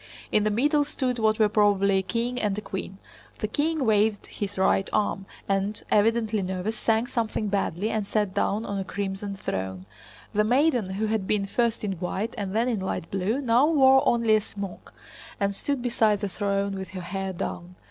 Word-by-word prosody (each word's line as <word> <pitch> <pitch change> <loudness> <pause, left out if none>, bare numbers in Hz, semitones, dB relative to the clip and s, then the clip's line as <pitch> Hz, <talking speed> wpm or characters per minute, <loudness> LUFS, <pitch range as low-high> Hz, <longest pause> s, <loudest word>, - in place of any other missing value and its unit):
In 210 - +3
the 215 - +2
middle 290 +8 +2
stood 260 -4 -2
what 215 -1 +2
were 215 - +4
probably 200 -2 +3
a - - 0
king 240 +5 -2
and 205 -2 0
a - - -2
queen. 190 -1 -6 0.4
The 215 - -2
king 295 +5 0
waved 210 -1 +2
his 205 -1 -5
right 190 0 +2
arm 200 -2 0 0.2
and, 195 +2 0
evidently 220 0 +2
nervous, 190 +3 -2
sang 225 +1 +1
something 225 -3 -2
badly 200 +1 -1
and 215 -2 -2
sat 205 -3 0
down 215 +4 0
on 200 -1 -3
a - - -1
crimson 195 +1 -4
throne. 95 - -4 0.5
The 210 0 +3
maiden 250 -2 +2
who 215 +2 0
had 215 -3 -1
been 205 -2 +1
first 235 +3 0
in 205 - -1
white 190 +5 -2
and 195 -1 -4
then 230 +2 +2
in 235 -5 0
light 190 -3 -4
blue, 195 +8 0
now 250 +2 +4
wore 265 -4 +6
only 230 -2 +4
a 215 - +2
smock, 200 -2 -8 0.5
and 200 0 +1
stood 270 +5 -2
beside 220 -4 +2
the 205 - -1
throne 200 +1 -1
with 190 - -5
her - - -4
hair 190 +2 -3
down. 180 0 -5
210 Hz, 195 wpm, -26 LUFS, 195-230 Hz, 0.5 s, wore